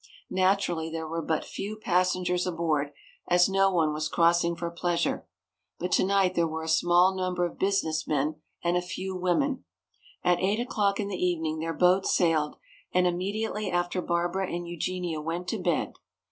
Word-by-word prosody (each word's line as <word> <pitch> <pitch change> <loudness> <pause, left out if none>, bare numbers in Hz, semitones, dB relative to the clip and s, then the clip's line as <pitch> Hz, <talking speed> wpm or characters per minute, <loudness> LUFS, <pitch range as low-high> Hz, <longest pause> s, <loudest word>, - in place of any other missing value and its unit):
Naturally 185 -4 +1
there 160 0 -4
were 165 +1 -3
but 160 0 -1
few 210 +2 -5
passengers 180 -2 +1
aboard, 160 -4 0 0.4
as 175 0 +5
no 195 0 +3
one 160 -4 +2
was 155 0 -2
crossing 170 0 +3
for 170 0 -4
pleasure. 170 0 -1 0.5
But 180 +1 -3
tonight 190 -1 +3
there 170 -2 +2
were 160 0 -4
a - - -6
small 175 +3 +4
number 185 -1 0
of 175 - -6
business 175 -5 0
men 150 +1 -1 0.2
and 170 0 +1
a 180 - +2
few 185 +1 -5
women. 215 +10 0 0.6
At 180 -1 +3
eight 200 +4 +1
o'clock 205 -4 0
in 205 - -1
the 190 -2 -3
evening 160 -3 0
their 165 +1 -3
boat 185 +1 +4
sailed, 160 -4 +2 0.4
and 180 0 +3
immediately 200 +4 -1
after 175 +1 0
Barbara 175 +2 -1
and 175 0 -4
Eugenia 175 -1 -3
went 170 +3 -4
to 220 - -2
bed. 175 -3 0
175 Hz, 170 wpm, -27 LUFS, 165-185 Hz, 0.6 s, as